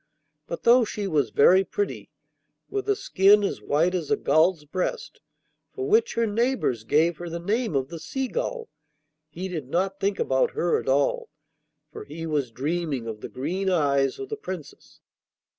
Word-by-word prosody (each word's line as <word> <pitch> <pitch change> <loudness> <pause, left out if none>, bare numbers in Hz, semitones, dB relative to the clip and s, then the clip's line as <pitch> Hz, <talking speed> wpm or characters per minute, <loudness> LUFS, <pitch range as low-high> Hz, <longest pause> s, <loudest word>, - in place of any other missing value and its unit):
But 170 - -6
though 240 +1 +6
she 210 -1 -4
was 150 - +1
very 185 - +5
pretty, 410 - -4 0.6
with 405 0 -3
a 410 - +4
skin 205 - +4
as 200 - -2
white 165 +5 +1
as 170 -5 -2
a - - +2
gull's 155 +2 +2
breast, 185 - -4 0.5
for 395 -1 -4
which 450 +3 +3
her 230 - +2
neighbours 225 - 0
gave 160 +7 +2
her 175 +1 -6
the 170 - -4
name 215 - -1
of 135 0 0
the 170 - -7
Seagull, 455 - -3 0.6
he 175 +5 -5
did 160 -8 -6
not 190 +4 -1
think 200 0 0
about 130 0 +1
her 175 - +2
at - - -5
all, 290 - +1 0.6
for 430 -1 -8
he 165 - -7
was 150 -5 -1
dreaming 145 0 -2
of 110 -2 -6
the - - -6
green 180 +9 -2
eyes 140 -6 +2
of 400 - -7
the 435 - -4
Princess. 185 - -9
180 Hz, 175 wpm, -25 LUFS, 150-235 Hz, 0.6 s, though